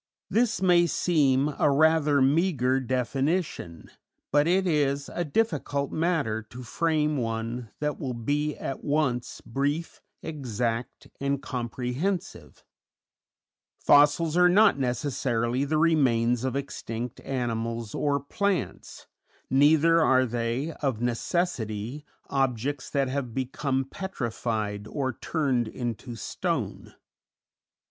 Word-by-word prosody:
This 230 -3 +1
may 175 -2 +5
seem 145 -4 +2
a - - +4
rather 150 -1 +4
meagre 135 -3 +2
definition, 130 - -2 0.4
but 145 +2 +4
it 185 +2 +3
is 145 -4 +1
a 175 - -1
difficult 150 -6 -1
matter 155 -10 0
to 120 +3 -11
frame 150 +3 0
one 115 0 -3
that 150 -1 -1
will 130 -4 -3
be 145 +6 -1
at 135 - -5
once 135 -5 -1
brief, 145 +7 -2 0.2
exact, 120 -5 -3
and 140 0 0
comprehensive; 130 - -4 1.1
fossils 150 +3 +4
are 180 0 +6
not 200 -4 +5
necessarily 125 -1 0
the 155 +2 0
remains 125 -7 +3
of 130 0 -1
extinct 120 -4 -5
animals 115 -3 -3
or 145 -1 +1
plants, 195 +7 -3 0.5
neither 155 +4 +5
are 130 -1 +4
they, 120 +5 -2
of 135 -6 0
necessity, 120 - -2 0.2
objects 135 0 -1
that 140 -2 +1
have 130 -3 -3
become 135 +1 -1
petrified 110 - -3
or 130 +2 -2
turned 130 -3 0
into 120 +1 -5
stone. 110 - -3
135 Hz, 105 wpm, -27 LUFS, 120-155 Hz, 1.1 s, are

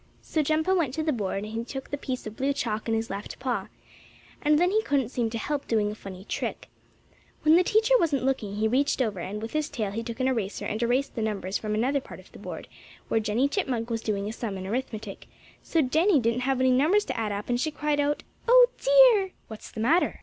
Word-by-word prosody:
So 315 - 0
Jumpo 315 +5 +1
went 295 -8 0
to 315 - -1
the 310 -1 +1
board, 200 -3 -2
and 215 +1 -7
he 230 +1 -2
took 270 +2 -7
the - - 0
piece 260 -3 -5
of 215 0 -7
blue 275 +3 0
chalk 225 -6 -3
in 225 - +2
his 225 -1 -2
left 200 +1 -6
paw. 245 -7 -2 0.7
And 300 0 +4
then 355 +3 +3
he 435 +2 +3
couldn't 275 - 0
seem 240 -3 -1
to 230 - -4
help 285 +5 -3
doing 210 -2 +1
a - - -5
funny 195 -2 -10
trick. - - -4 0.7
When 310 +1 +6
the 355 - +6
teacher 440 +6 +3
wasn't 290 - +1
looking 225 -7 -1
he 215 +1 +1
reached 275 +6 +1
over, 215 -7 0
and 195 +4 -4
with 225 - -6
his 305 -1 0
tail 220 -8 -3
he 225 +3 -3
took 230 +1 -6
an 260 - +2
eraser 225 -6 -2
and 215 +2 -3
erased 245 +4 +1
the 230 - -3
numbers 200 -3 -2
from 215 -1 -2
another 265 +6 +1
part - - -11
of - - -17
the - - -13
board - - -7 0.4
where 225 - +2
Jennie 220 +5 +1
Chipmunk 250 - -2
was 225 -1 -1
doing 205 -2 -2
a 215 - -4
sum 220 -4 -4
in 190 - -6
arithmetic, 220 +1 -4 0.3
so 325 -2 +1
Jennie 315 +6 +3
didn't 235 0 +1
have 265 -1 +1
any 260 0 +4
numbers 315 +11 +3
to 255 - -3
add 220 -3 -1
up, 205 +1 -4
and 245 0 0
she 310 - +1
cried 300 -1 -1
out: 290 +1 0 0.2
"Oh, - - +7
dear!" - - +6 0.2
"What's 220 -1 -9
the 220 - -6
matter?" 315 +10 +2
250 Hz, 245 wpm, -27 LUFS, 220-300 Hz, 0.7 s, Oh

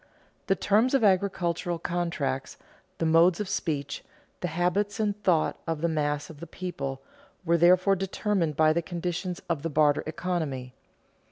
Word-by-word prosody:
The 195 - +3
terms 220 +8 +2
of 265 - +2
agricultural 180 -3 +1
contracts, 165 -7 -2 0.4
the 165 - -1
modes 165 +2 +5
of 210 - -2
speech, 150 -7 -3 0.4
the 180 - -2
habits 180 +5 0
and 210 -2 +1
thought 170 -6 +2
of 165 -2 -2
the 170 - +2
mass 150 -2 -1
of 155 -3 -12
the 170 - -8
people, 140 -7 -5 0.4
were 170 0 +3
therefore 185 +3 +5
determined 190 -3 -1
by 155 0 +5
the 170 - +1
conditions 175 +1 -4
of 165 -4 -1
the 165 - -2
barter 150 -1 +3
economy. 155 -7 -3
170 Hz, 155 wpm, -27 LUFS, 155-185 Hz, 0.4 s, modes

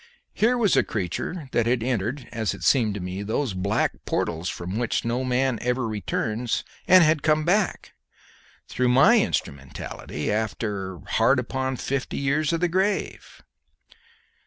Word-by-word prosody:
Here 245 +3 +2
was 215 -6 +3
a - - +5
creature 115 - -4
that 115 -1 +1
had 120 -1 +1
entered, 120 +2 -2
as 110 -3 -2
it - - -11
seemed 110 -7 +3
to - - -4
me, 90 +2 -5
those 110 +3 -1
black 100 +3 -1
portals 85 +2 -2
from 90 +5 -4
which 120 -1 -1
no 120 +2 -1
man 130 -2 +1
ever 125 0 0
returns, 110 +2 -2 0.2
and 185 -1 +8
had 155 -1 +3
come 155 0 +2
back, 195 +2 0 0.7
through 125 -1 0
my 175 - +6
instrumentality, 70 - -4
after 105 -4 -3
hard 120 +5 +3
upon 130 +1 -2
fifty 140 +1 -3
years 140 +2 +1
of 165 0 -1
the 175 - +3
grave. 190 +4 -2
125 Hz, 150 wpm, -25 LUFS, 105-145 Hz, 0.7 s, and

